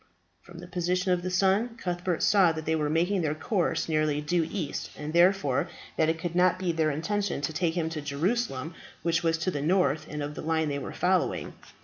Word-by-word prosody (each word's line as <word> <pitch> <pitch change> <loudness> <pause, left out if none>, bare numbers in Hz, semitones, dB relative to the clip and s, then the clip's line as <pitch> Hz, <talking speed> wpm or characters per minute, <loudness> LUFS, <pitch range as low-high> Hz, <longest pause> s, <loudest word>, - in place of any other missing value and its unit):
From 175 -1 -14
the 175 - -8
position 180 +1 0
of 180 -1 +2
the 185 - -3
sun, 195 +6 +1
Cuthbert 175 -3 -2
saw 195 -5 +5
that 160 -1 -6
they 160 - +1
were 150 -2 0
making 175 +5 +1
their 155 -2 0
course 180 +3 0
nearly 155 -2 +1
due 160 +2 0
east, 170 -8 -4
and 150 +1 -5
therefore 175 -6 +3 0.3
that 160 0 +2
it 160 - 0
could 170 +1 -4
not 180 0 +4
be 185 -2 -1
their 160 -1 +1
intention 185 +5 -1
to 150 +2 -2
take 165 +1 0
him 165 -2 0
to 155 -2 -4
Jerusalem, 160 - -1 0.3
which 170 0 +1
was 165 -1 +1
to 180 +3 -1
the 145 - -3
north 170 -1 +1
of 150 -1 -4
the - - -7
line 160 -1 0
they 140 0 -2
were 135 - -6
following. - - 0
165 Hz, 215 wpm, -28 LUFS, 155-180 Hz, 0.3 s, saw